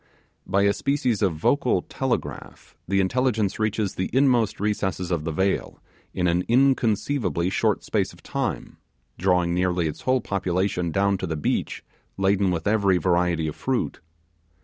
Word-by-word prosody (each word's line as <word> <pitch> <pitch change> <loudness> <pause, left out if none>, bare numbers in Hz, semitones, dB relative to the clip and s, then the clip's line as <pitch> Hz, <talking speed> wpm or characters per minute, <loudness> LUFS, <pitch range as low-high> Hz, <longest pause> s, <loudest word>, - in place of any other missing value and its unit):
By 100 +1 +2
a 100 0 +4
species 135 -6 0
of 95 -6 +1
vocal 75 - +1
telegraph - - -4
the 95 +1 +1
intelligence 110 0 0
reaches 110 -2 0
the 95 - -3
inmost 125 -5 +2
recesses 95 -3 -1
of 80 -3 -1
the 80 - -1
vale 95 +5 -1 0.3
in 90 - -1
an 90 +1 +2
inconceivably 115 - +1
short - - +1
space - - -1
of - - -18
time, - - -3 0.4
drawing 90 -1 +2
nearly 90 -1 +1
its 75 - -6
whole 130 0 +1
population 95 -1 -1
down 100 +2 +1
to 95 - -3
the 80 -1 -3
beach 75 - -2 0.3
laden 95 0 +2
with 85 -3 -2
every 100 -3 +3
variety 85 -1 +1
of 75 - -5
fruit. 130 -2 -2
95 Hz, 150 wpm, -24 LUFS, 90-110 Hz, 0.4 s, a